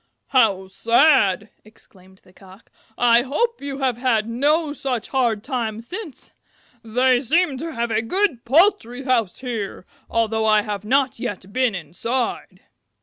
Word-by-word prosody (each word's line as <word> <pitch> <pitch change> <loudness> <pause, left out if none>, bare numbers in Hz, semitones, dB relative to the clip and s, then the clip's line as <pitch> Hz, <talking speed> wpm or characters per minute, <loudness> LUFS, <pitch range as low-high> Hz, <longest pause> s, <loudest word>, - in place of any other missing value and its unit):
"How 215 -7 +3
sad!" 220 -1 +3
exclaimed 190 -3 -20
the 185 - -22
Cock. 190 +2 -18 0.3
"I 235 -1 +5
hope 460 - -1
you 280 -1 -5
have 260 -4 -1
had 235 -4 +1
no 290 +6 +1
such 255 -6 -4
hard 235 -6 0
time 230 -6 -3
since. 335 - -9 0.5
They 250 +3 +2
seem 295 +4 +1
to 330 +3 -5
have 235 -2 -2
a 220 0 +1
good 310 - -1
poultry 270 - +2
house 240 -8 0
here, 225 -7 -5 0.2
although 220 -1 0
I 215 -1 +4
have 205 -2 -5
not 260 +3 +1
yet 200 -5 -6
been 255 -5 +1
inside." 230 - -4
235 Hz, 145 wpm, -21 LUFS, 215-270 Hz, 0.5 s, I